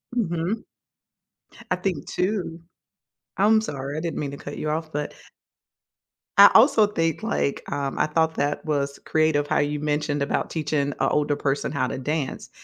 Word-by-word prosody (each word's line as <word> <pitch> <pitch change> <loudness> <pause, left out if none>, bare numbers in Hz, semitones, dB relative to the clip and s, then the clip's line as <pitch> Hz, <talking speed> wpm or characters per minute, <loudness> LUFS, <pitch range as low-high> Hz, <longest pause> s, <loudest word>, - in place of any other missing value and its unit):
Mhm. 180 0 -1 1.1
I - - +4
think 180 -5 -3
too 180 -4 -2 0.8
I'm 215 +3 +4
sorry, 140 -6 -5
I - - -2
didn't 165 -2 -3
mean 140 -2 -3
to 140 - -7
cut 145 0 -8
you 150 - -2
off, 160 0 -3
but 150 +1 -3 1.3
I 200 - +11
also 225 -3 +6
think, 165 -3 -1
like 220 -10 -1
um, 140 -1 -2
I - - +3
thought 160 +1 +1
that 145 +3 -1
was 140 -2 -1
creative 155 -2 +2
how - - +1
you 145 0 0
mentioned 150 -1 -1
about - - -1
teaching 155 -2 -1
an 145 - -3
older 145 -1 +1
person 140 0 -1
how 145 - 0
to - - -4
dance. 145 0 -3
155 Hz, 165 wpm, -24 LUFS, 145-170 Hz, 1.3 s, I